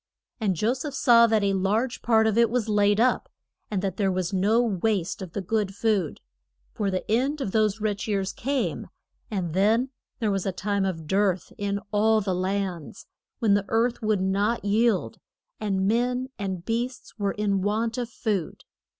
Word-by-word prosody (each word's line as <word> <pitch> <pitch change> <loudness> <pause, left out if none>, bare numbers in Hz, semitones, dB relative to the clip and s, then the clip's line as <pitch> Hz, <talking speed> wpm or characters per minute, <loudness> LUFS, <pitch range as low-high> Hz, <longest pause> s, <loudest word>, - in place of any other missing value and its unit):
And 200 -5 +1
Jo 215 +8 +1
seph 270 +2 -5
saw 235 -3 +6
that 220 -2 +2
a 200 0 +2
large 210 +6 0
part 220 -1 +3
of 220 -2 +2
it 235 -1 +4
was 235 -1 -1
laid 205 -1 +3
up, 245 +2 +2 0.4
and 200 -3 -2
that 195 -2 -2
there 195 -2 +1
was 185 +1 -2
no 205 +5 +3
waste 210 -4 0
of 185 -3 -7
the 200 - -2
good 205 0 -1
food. 205 -7 0 0.5
For 205 -2 -1
the 185 -1 -3
end 265 +7 +1
of 235 -8 -2
those 215 0 +1
rich 210 -1 -2
years 195 -3 -1
came 275 +1 -2 0.4
and 185 -6 -3
then 220 +7 +2 0.3
there 220 -4 0
was 195 -1 -1
a - - +1
time 200 +1 -1
of 165 -4 -3
dearth 190 +1 0
in 200 0 -2
all 220 +1 +3
the 195 -3 -1
lands, 185 -3 -3 0.3
when 220 -5 +2
the 200 -1 +2
earth 230 +4 +1
would 215 -3 +1
not 200 +4 0
yield, 215 0 +1 0.4
and 195 -2 0
men 245 +3 0
and 190 -3 -4
beasts 240 +1 -3
were 200 -1 0
in 200 -2 0
want 225 +4 -1
of 240 -2 -3
food. 210 -8 -3
210 Hz, 185 wpm, -26 LUFS, 195-230 Hz, 0.5 s, saw